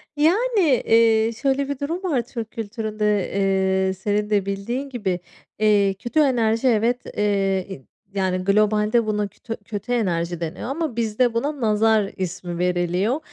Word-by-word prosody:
Yani, 410 +10 +2 0.3
eee, 225 0 +4
şöyle 275 +1 0
bir 285 - -3
durum 335 +7 -3
var 290 -10 +1
Türk 230 -2 -7
kültüründe, 215 -1 -4 0.8
eee, 190 - 0
senin 210 +2 -1
de 200 -2 +1
bildiğin 235 +8 -3
gibi, 200 -8 -2 0.4
eee 205 -2 +3
kötü 240 +10 -2
enerji, 240 -3 +2
evet, 235 +2 +2 0.2
eee, 195 -6 0 0.3
yani 190 -2 0
globalde 210 +3 +2
buna 210 -1 -1
tö 225 +3 -7
kötü 215 +3 -5
enerji 175 -7 0
deniyor 170 +8 -5
ama 300 -4 -2
bizde 230 +1 +1
buna 280 +4 -2
"nazar" 215 -1 +2
ismi 180 -1 -4
veriliyor 180 - 0
215 Hz, 140 wpm, -22 LUFS, 195-245 Hz, 0.8 s, eee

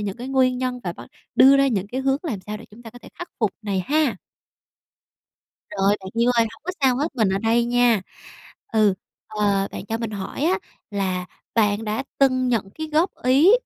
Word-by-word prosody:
những 200 -2 -3
cái 245 +2 -7
nguyên 255 -2 +2
nhân 250 -1 -2
và 175 - -2
bắt - - -11 0.3
đưa 270 +2 +7
ra 275 - +4
những 205 -6 -1
cái 250 +6 -4
hướng 270 +1 +1
làm 250 - -3
sao 210 +3 -6
để - - -11
chúng 220 +3 -15
ta 225 - -10
có 245 - -13
thể 240 - -14
khắc 350 - -6
phục 215 -4 +1
này 200 -3 -1
ha. 295 -7 +2 1.5
Rồi, 200 0 +2
bạn 190 0 -8
yêu 245 - +4
ơi, 230 - +4
hổng 225 - -16
có 365 - -2
sao 260 -3 +3
hết, 295 +3 -2
mình 220 -5 +3
ở 190 - 0
đây 230 +3 +2
nha. 240 -2 +3 0.7
Ừ, 215 -3 +4 0.3
ờ, 205 -2 0
bạn - - -7
cho 225 +1 -2
mình 230 -2 -3
hỏi 200 +5 -5
á 360 +4 +2 0.3
là 185 -3 -2 0.3
bạn 210 -1 +2
đã 215 +5 -2
từng 255 -2 +3
nhận 220 -5 0
cái 315 - -5
góp 330 +5 +3
ý, 270 +8 +5
230 Hz, 215 wpm, -23 LUFS, 205-260 Hz, 1.5 s, đưa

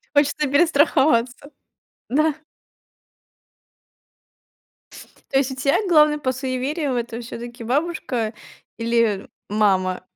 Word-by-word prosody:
хочется 290 +1 +2
перестраховаться, 285 -4 +2 0.6
да. 305 +3 +2 3.0
То 270 - +3
есть 270 -1 +1
у - - -5
тя 275 +2 +1
главный 300 -3 +5
по 260 -3 -1
суевериям 260 +2 -2
это 235 0 -4
всё-таки 235 +1 -8
бабушка 250 -4 -1 0.4
или 230 -3 0 0.2
мама? 190 -3 +1
260 Hz, 90 wpm, -22 LUFS, 230-295 Hz, 3.0 s, главный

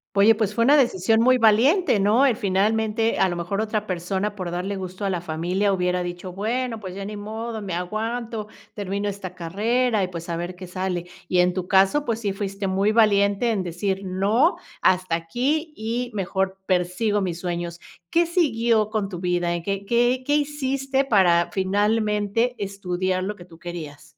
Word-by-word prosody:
Oye, 205 +3 +6
pues 210 -2 -1
fue 230 - +3
una 280 +4 +6
decisión 225 -5 +3
muy 255 +1 +5
valiente, 235 - +4
¿no? 215 +7 +4
El 255 -5 +3
finalmente, 220 +2 +1
a 190 - +4
lo 175 - -3
mejor, 180 +4 -2
otra 215 -1 -2
persona 190 +3 -2
por 185 -3 -4
darle 180 +3 -3
gusto 185 +1 -5
a 195 - +1
la 175 -2 -2
familia 175 +5 0
hubiera 180 -1 0
dicho: 175 +1 -5
"Bueno, 225 +4 -2
pues 185 -2 -7
ya 195 - -5
ni 210 +1 -6
modo, 220 +2 -5
me 190 -4 -4
aguanto, 220 +4 -3 0.3
termino 200 0 -3
esta 190 -2 -5
carrera 215 +6 0
y, - - 0
pues, 170 -2 -7
a 170 - -1
ver 175 +2 -4
qué 185 +1 -9
sale". 180 -1 -3 0.2
Y 180 - +1
en 180 0 +2
tu 180 -1 -4
caso, 195 +10 +3
pues 230 -1 -2
sí 200 -3 -1
fuiste 195 0 -4
muy 195 +2 +2
valiente 210 0 +3
en 205 - 0
decir: 190 +2 -2
"No, 205 - +2 0.3
hasta 185 -2 +2
aquí 265 - -1
y 235 +3 -2
mejor 190 0 -1
persigo 185 +3 +1
mis 180 -3 -3
sueños." 175 -1 -4 0.3
¿Qué 340 +1 +3
siguió 235 - +2
con 215 -3 -2
tu 175 -3 -6
vida? 175 -1 0
¿En 170 - -3
qué 200 +2 -3
qué 240 +3 +2
qué 290 - +1
hiciste 275 -2 0
para 175 -7 +3
finalmente 210 +3 +1
estudiar 185 -2 -2
lo 205 +2 -3
que 175 - -13
tú 165 -2 -17
querías? 155 -4 -8
200 Hz, 185 wpm, -23 LUFS, 180-225 Hz, 0.3 s, Oye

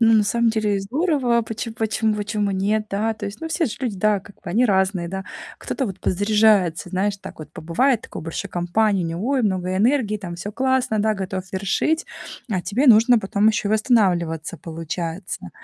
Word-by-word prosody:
ну, 225 -1 +6
на 215 - +5
самом 235 +2 +2
деле 210 -3 0
здорово, 255 - +1
почем 225 +1 -5
почем 220 -1 0
почему 205 0 -1
нет, 210 +3 0
да? 215 +3 0
То 210 -1 -6
есть, 200 +2 -7
ну, 325 - -4
все 320 0 0
же 215 - -5
люди, 220 -7 -3
да, 210 0 +3
как 200 +1 -15
бы - - -33
они 230 +8 +2
разные, 190 -4 +1
да. 190 +1 -5 0.3
Кто-то 270 - -3
вот 195 -4 -6
подзаряжается, 205 -3 +2
знаешь, 195 +2 -1
так - - -10
вот 155 - -10
побывает, 195 - +1
такой - - -9
большой 165 +5 -5
компании, 185 +2 +1
у - - -1
него, 175 +9 -3
ой, 270 -3 +1
много 185 -2 0
энергии, 220 0 +2
там 175 -4 -7
всё 205 +4 -6
классно, 260 -3 +1
да, 220 +1 +2
готов 190 -1 -4
вершить, 205 - 0 0.4
а 185 -4 0
тебе 255 +8 0
нужно 235 +1 +7
потом 200 +1 +2
ещё 215 -2 0
и - - +1
восстанавливаться, 180 - +1
получается. 165 - -5
210 Hz, 195 wpm, -22 LUFS, 190-225 Hz, 0.4 s, нужно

